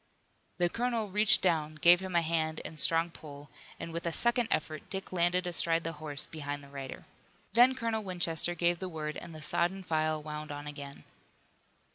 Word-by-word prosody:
The 175 -1 +3
colonel 230 +1 -1
reached 210 0 +6
down, 155 -4 +1
gave 175 +3 +6
him 190 -1 -5
a 170 - +4
hand 160 -1 0
and - - -6
a - - -14
strong 165 +3 +2
pull, 145 -2 -11 0.3
and 165 - -6
with 170 +1 -3
a - - 0
second 235 +5 +2
effort 155 0 -2
Dick 190 -1 -5
landed 180 +1 +2
astride 165 -1 +1
the 165 - -2
horse 145 -3 -1
behind 145 -2 -5
the 140 - -14
rider. 135 -2 -8 0.5
Then 245 +3 +6
Colonel 230 -3 -1
Winchester 175 -3 0
gave 175 +1 +1
the 185 - -4
word 155 -2 -4
and 165 - -8
the 155 - -9
sodden 175 +4 0
file 155 -2 0
wound 150 0 -6
on 145 0 -6
again. 140 -1 -8
165 Hz, 190 wpm, -31 LUFS, 155-185 Hz, 0.5 s, reached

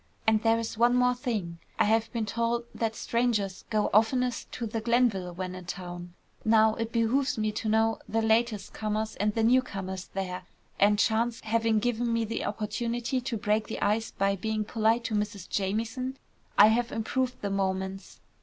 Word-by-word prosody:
And 220 -1 +3
there's 225 -1 0
one 240 +1 +5
more 250 0 +4
thing. 210 -9 -3 0.2
I - - +4
have 225 +1 +2
been 230 -2 -2
told 235 +2 -1
that 225 -1 -2
strangers 220 -5 -1
go 215 -2 +1
oftenest 245 +3 +2
to 235 - -3
the 225 0 -3
Glenville 225 -6 +2
when 180 +1 -5
in 185 -1 -8
town. 175 -1 -7 0.3
Now 220 0 +5
it 230 0 -3
behoves 240 +4 +1
me 215 0 0
to 215 +1 -3
know 220 0 +2
the 225 +1 +1
latest 220 -1 +1
comers, 215 0 -2
and 210 0 0
the 225 - +1
newcomers 195 -7 0
there, 185 -1 -4 0.3
and 205 +1 +5
chance 230 +3 +1
having 225 0 +1
given 240 +1 0
me 230 -1 -1
opportunity 235 +4 -2
to 240 -2 -3
break 210 +1 0
the - - -5
ice 220 +2 +1
by 195 0 0
being 215 +2 -2
polite 225 +2 +1
to 230 - -3
Mrs. 205 -3 -2
Jamieson, 225 +7 -2 0.4
I 210 - +9
have 235 +2 +1
improved 250 +3 -1
the 200 - -1
moments. 190 0 -3
220 Hz, 175 wpm, -28 LUFS, 205-235 Hz, 0.4 s, I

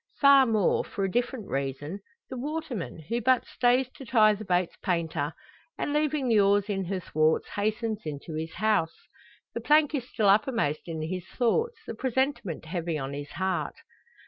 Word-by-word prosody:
Far 275 -2 +7
more 215 -4 +2
for 200 - -4
a 190 - 0
different 240 -1 -1
reason 140 +6 -3 0.3
the 260 - -7
waterman; 260 - -4
who 235 +4 -1
but 255 +2 +3
stays 250 +1 +2
to 270 - -11
tie 220 -4 +5
the 210 +1 -6
boat's 180 -3 0
painter; 165 -5 -1 0.5
and, 290 - -2
leaving 300 -2 +1
the 225 -3 +4
oars 200 +1 +3
in 195 -2 -1
her 190 +1 -2
thwarts, 155 -2 +1
hastens 215 +1 -2
into 150 +1 -6
his 160 +1 -4
house. 210 -4 +1 0.6
The - - -4
plank 300 0 +4
is 260 -4 -3
still 215 -3 +1
uppermost 205 - +2
in 160 -2 -4
his 180 +2 -4
thoughts, 455 - 0
the - - -5
presentiment 260 - -1
heavy 165 -1 -2
on 135 -1 -4
his 145 0 -6
heart. 190 0 -1
205 Hz, 170 wpm, -28 LUFS, 165-250 Hz, 0.6 s, Far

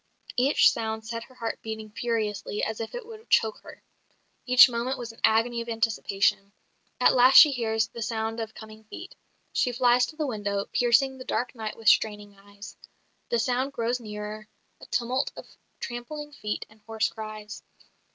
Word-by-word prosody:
Each 265 +4 +5
sound 220 -1 -4
set 230 +1 -5
her 255 - -20
heart 230 -2 -4
beating 220 -1 -7
furiously 215 -3 -2
as 220 0 -2
if 225 - -5
it - - -6
would 445 -1 -12
choke 220 -1 +2
her. - - -14 0.6
Each 250 +1 +9
moment 245 +2 -2
was 235 -1 -6
an 225 - -19
agony 235 +2 +3
of 235 - -7
anticipation. 200 -3 0 0.5
At 250 - +5
last 255 +1 +5
she 300 - +10
hears 220 -3 0
the 235 - -9
sound 225 +1 -2
of 220 -1 -5
coming 220 0 -12
feet. 355 - -10 0.4
She 250 - +1
flies 245 0 +3
to - - -10
the 310 -1 -2
window, 205 -5 -2
piercing 260 +2 +3
the - - -7
dark 250 -1 -2
night 220 -3 -6
with 225 -1 -8
straining 210 -1 +2
eyes. 200 +1 -13 0.5
The 235 - +1
sound 255 +4 0
grows 240 +1 -1
nearer, 210 -1 -7 0.3
a - - -12
tumult 255 +3 -1
of - - -9 0.3
trampling 295 +5 -6
feet 210 -7 -4
and 215 0 -22
hoarse 220 -1 0
cries. 215 -1 -8
225 Hz, 175 wpm, -26 LUFS, 215-250 Hz, 0.6 s, she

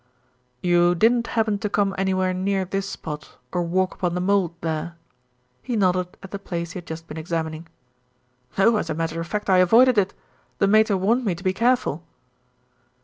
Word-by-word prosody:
"You 175 0 +4
didn't 230 +5 +3
happen 220 -3 0
to 210 -1 -2
come 200 -1 +1
anywhere 185 -1 0
near 190 +1 0
this 195 +2 -3
spot, 150 -1 -7
or 180 - 0
walk 185 +2 0
upon 175 -2 -2
the - - -1
mould 185 -2 +1
there?" 160 +1 -3 0.7
He 245 - -3
nodded 185 -3 +1
at 195 - -10
the 200 - -5
place 170 -3 -4
he - - -7
had 175 - -14
just 160 0 -7
been 155 - -8
examining. 160 0 -4 0.9
"No; 220 +3 +4
as 170 - -3
a 160 - -1
matter 165 0 -2
of 165 - -6
fact, 210 +3 -3
I 190 -2 +4
avoided 230 +6 +6
it. 195 -1 -1 0.4
The 200 - +2
Mater 215 -1 +4
warned 225 +7 +1
me 195 -6 0
to 175 - -12
be 185 -1 +1
careful." 230 - +1
185 Hz, 190 wpm, -23 LUFS, 170-205 Hz, 0.9 s, avoided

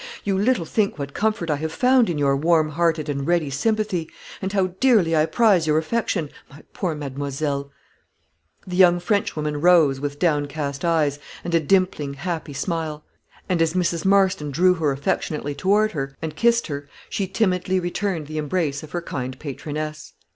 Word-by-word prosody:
You 200 -1 0
little 205 -2 +1
think 205 +3 0
what 140 -1 -5
comfort 210 -6 0
I 150 - +1
have 160 +2 -3
found 250 +3 +3
in 165 - -1
your 140 -1 +2
warm 155 +1 +2
hearted 160 -1 0
and 140 -1 -3
ready 170 -5 +1
sympathy, 200 +1 -1 0.3
and 190 0 -2
how 190 -3 0
dearly 215 -11 +4
I 155 0 +3
prize 200 -8 +3
your 155 0 +3
affection, 165 -2 -1 0.2
my 145 +1 -15
poor 175 -5 -2
mademoiselle." 140 0 -3 0.9
The 180 - -5
young 175 -2 +6
Frenchwoman 150 -7 -1
rose, 165 -6 +5
with 145 0 -4
downcast 145 -3 -1
eyes, 155 -4 +1 0.2
and 170 - -4
a 165 - +5
dimpling, 160 -4 +1
happy 165 -1 -4
smile; 155 +1 -3 0.4
and, 180 -4 +1
as 165 -1 +2
Mrs. 170 -2 0
Marston 190 -5 +3
drew 180 +6 +4
her 160 -5 0
affectionately 145 +1 -2
toward 205 +8 +2
her, 135 -3 -4
and 155 -1 -5
kissed 235 +4 +3
her, 145 -2 -6 0.2
she 195 - -2
timidly 185 -2 +1
returned 175 -2 -2
the 155 +1 -4
embrace 150 -2 -1
of 155 - -12
her 175 -1 -2
kind 130 -4 -5
patroness. 155 +2 -6
160 Hz, 170 wpm, -23 LUFS, 145-185 Hz, 0.9 s, young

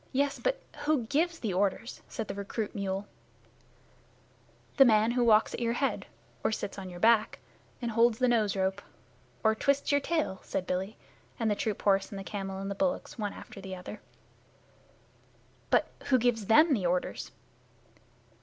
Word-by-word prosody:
"Yes, 280 +1 +1
but - - 0 0.3
who 300 -5 +2
gives 330 +7 +1
the 215 - -3
orders?" 200 +5 -1
said 225 -3 -4
the - - -4
recruit 200 +2 -4
mule. 195 0 -3 1.7
"The 275 - +10
man 220 -2 +4
who 245 0 +2
walks 220 -2 +4
at - - -4
your 235 -1 0
head 270 +3 -1 0.4
Or - - +2
sits 205 -2 -4
on 190 -1 -7
your 175 -1 -9
back 225 +1 +4 0.5
Or 235 - 0
holds 230 0 +3
the 255 - +2
nose 220 -5 +2
rope 190 +1 0 0.6
Or 220 -1 +5
twists 280 +6 +1
your 285 0 +3
tail," 305 - -1
said 185 - -3
Billy 190 +4 -3 0.4
and 225 -2 +1
the - - +2
troop 210 0 -3
horse 195 -1 +3
and 200 - -7
the 195 - -5
camel 195 -1 -5
and 195 +1 -4
the - - 0
bullocks 270 +2 -2
one 205 -1 -2
after 195 - -11
the 190 -1 -6
other. 185 +3 -9 1.7
"But - - +3 0.2
who 260 - +4
gives 230 -4 +1
them 305 +7 +6
the 195 -8 +1
orders?" 180 +1 -2
220 Hz, 175 wpm, -30 LUFS, 195-245 Hz, 1.7 s, The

